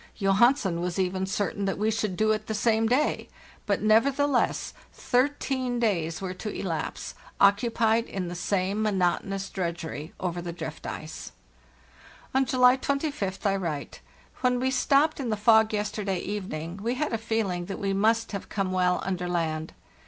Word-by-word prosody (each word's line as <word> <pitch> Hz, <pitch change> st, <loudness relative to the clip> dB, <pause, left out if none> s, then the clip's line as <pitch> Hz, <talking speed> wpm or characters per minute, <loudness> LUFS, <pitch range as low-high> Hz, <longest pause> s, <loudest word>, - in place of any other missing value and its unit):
Johansen 195 Hz, -2 st, +3 dB
was 180 Hz, +1 st, -2 dB
even 190 Hz, 0 st, 0 dB
certain 200 Hz, 0 st, -1 dB
that 195 Hz, -, -1 dB
we 215 Hz, +2 st, +1 dB
should 215 Hz, -4 st, -2 dB
do 215 Hz, 0 st, +3 dB
it 215 Hz, -, -1 dB
the 220 Hz, -, -2 dB
same 225 Hz, 0 st, +2 dB
day, 260 Hz, +6 st, +1 dB, 0.4 s
but -, -, 0 dB
nevertheless 260 Hz, +5 st, +2 dB, 0.2 s
thirteen 255 Hz, -1 st, 0 dB
days 170 Hz, -8 st, 0 dB
were 185 Hz, -1 st, -3 dB
to 210 Hz, +4 st, -5 dB
elapse, 170 Hz, -6 st, -4 dB, 0.3 s
occupied 225 Hz, +2 st, +3 dB
in 185 Hz, -2 st, -4 dB
the 175 Hz, -, -5 dB
same 190 Hz, +3 st, -1 dB
monotonous 195 Hz, -1 st, 0 dB
drudgery 170 Hz, -3 st, -4 dB
over 175 Hz, -1 st, -2 dB
the 175 Hz, 0 st, -5 dB
drift 160 Hz, -3 st, -7 dB
ice. 155 Hz, 0 st, -7 dB, 1.0 s
On 265 Hz, +1 st, +3 dB
July 250 Hz, 0 st, +5 dB
25th 275 Hz, -9 st, -2 dB
I 195 Hz, -1 st, +3 dB
write: 165 Hz, -7 st, -4 dB, 0.4 s
"When 250 Hz, -1 st, +1 dB
we 260 Hz, +1 st, +1 dB
stopped 285 Hz, +4 st, +3 dB
in 255 Hz, -4 st, -2 dB
the 215 Hz, -, 0 dB
fog 220 Hz, +1 st, +5 dB
yesterday 205 Hz, -2 st, -2 dB
evening 185 Hz, -4 st, -4 dB
we 235 Hz, +4 st, -1 dB
had 300 Hz, 0 st, -2 dB
a 225 Hz, -, 0 dB
feeling 215 Hz, -6 st, -1 dB
that 195 Hz, -, -5 dB
we 195 Hz, -1 st, -1 dB
must 225 Hz, +3 st, +2 dB
have 200 Hz, -, -5 dB
come 195 Hz, -2 st, -1 dB
well 180 Hz, -1 st, +1 dB
under 180 Hz, -2 st, -2 dB
land. 160 Hz, -2 st, -1 dB
205 Hz, 160 wpm, -27 LUFS, 180-230 Hz, 1.0 s, July